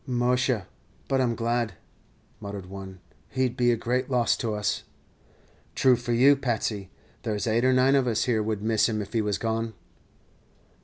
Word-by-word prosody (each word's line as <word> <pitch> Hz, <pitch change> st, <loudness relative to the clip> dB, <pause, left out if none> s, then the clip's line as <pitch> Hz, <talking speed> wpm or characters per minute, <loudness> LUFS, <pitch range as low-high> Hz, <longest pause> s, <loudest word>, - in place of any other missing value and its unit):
"Musha, 125 Hz, -3 st, +1 dB, 0.4 s
but 135 Hz, -1 st, +1 dB
I -, -, +3 dB
'm 120 Hz, -1 st, -1 dB
glad," 115 Hz, -2 st, -1 dB, 0.7 s
muttered 100 Hz, -2 st, -7 dB
one; 95 Hz, 0 st, -9 dB, 0.3 s
"he 130 Hz, 0 st, +1 dB
'd 120 Hz, -, -7 dB
be 120 Hz, -1 st, +2 dB
a -, -, +3 dB
great 125 Hz, +3 st, -1 dB
loss 125 Hz, -3 st, +2 dB
to 110 Hz, -4 st, -2 dB
us." 105 Hz, 0 st, -1 dB, 0.9 s
"True 130 Hz, -1 st, +5 dB
for 120 Hz, 0 st, -4 dB
you, 130 Hz, +5 st, +6 dB
Patsey; 110 Hz, -7 st, -2 dB, 0.3 s
there's 110 Hz, -2 st, -2 dB
eight 115 Hz, +1 st, +1 dB
or 130 Hz, -, +4 dB
nine 130 Hz, +1 st, +4 dB
of 135 Hz, -2 st, +3 dB
us 115 Hz, -2 st, +1 dB
here 115 Hz, -3 st, +1 dB
would 105 Hz, -1 st, -2 dB
miss 110 Hz, +1 st, +2 dB
him 110 Hz, -1 st, -1 dB
if 105 Hz, -, -6 dB
he 115 Hz, -, +2 dB
was 105 Hz, -2 st, -1 dB
gone." 115 Hz, 0 st, -2 dB
115 Hz, 185 wpm, -26 LUFS, 105-125 Hz, 0.9 s, you